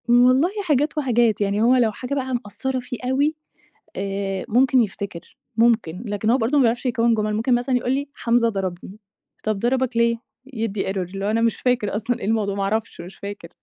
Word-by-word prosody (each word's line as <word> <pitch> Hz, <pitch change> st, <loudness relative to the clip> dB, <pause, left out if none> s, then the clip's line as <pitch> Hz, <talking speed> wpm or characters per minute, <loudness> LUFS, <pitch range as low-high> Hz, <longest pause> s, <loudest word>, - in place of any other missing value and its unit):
والله 255 Hz, +6 st, +5 dB, 0.2 s
حاجات 300 Hz, 0 st, +1 dB
وحاجات، 240 Hz, -6 st, +2 dB
يعني 205 Hz, +1 st, +1 dB
هو 245 Hz, +3 st, +5 dB
لو 235 Hz, -3 st, +3 dB
حاجة 250 Hz, +5 st, -5 dB
بقى 260 Hz, -2 st, -2 dB
مأثرة 240 Hz, +6 st, -3 dB
فيه 250 Hz, 0 st, -6 dB
أوي 285 Hz, +4 st, +2 dB, 0.6 s
آآ 195 Hz, -1 st, -3 dB
ممكن 255 Hz, +2 st, +4 dB
يفتكر، 195 Hz, -4 st, -7 dB, 0.2 s
ممكن، 225 Hz, -5 st, +2 dB
لكن 205 Hz, +1 st, -1 dB
هو 245 Hz, -, +4 dB
برضو 255 Hz, +4 st, +1 dB
ما 275 Hz, -, +5 dB
بيعرفش 235 Hz, +2 st, +1 dB
يكوِّن 235 Hz, -2 st, +2 dB
جُمل، 215 Hz, -1 st, 0 dB
ممكن 235 Hz, +3 st, +2 dB
مثلًا 245 Hz, +2 st, 0 dB
يقول 245 Hz, +1 st, -1 dB
لي: 280 Hz, +2 st, -1 dB
"حمزة 235 Hz, 0 st, +2 dB
ضربني." 190 Hz, 0 st, -5 dB, 0.4 s
"طَب 215 Hz, -2 st, -1 dB
ضربك 250 Hz, +1 st, 0 dB
ليه؟" 235 Hz, 0 st, +3 dB, 0.4 s
يدّي 220 Hz, -4 st, -2 dB
error، -, -, -5 dB
اللي 190 Hz, +2 st, -4 dB
هو: -, -, +1 dB
"أنا 225 Hz, +1 st, +1 dB
مش 230 Hz, -1 st, +2 dB
فاكر 245 Hz, -5 st, 0 dB
أصلًا 230 Hz, +3 st, -1 dB
إيه -, -, -5 dB
الموضوع، 210 Hz, -2 st, 0 dB
ما 200 Hz, -, -1 dB
أعرفش، 215 Hz, -1 st, -2 dB
مش 180 Hz, +3 st, -10 dB
فاكر. 200 Hz, -4 st, -8 dB
230 Hz, 200 wpm, -22 LUFS, 205-250 Hz, 0.6 s, والله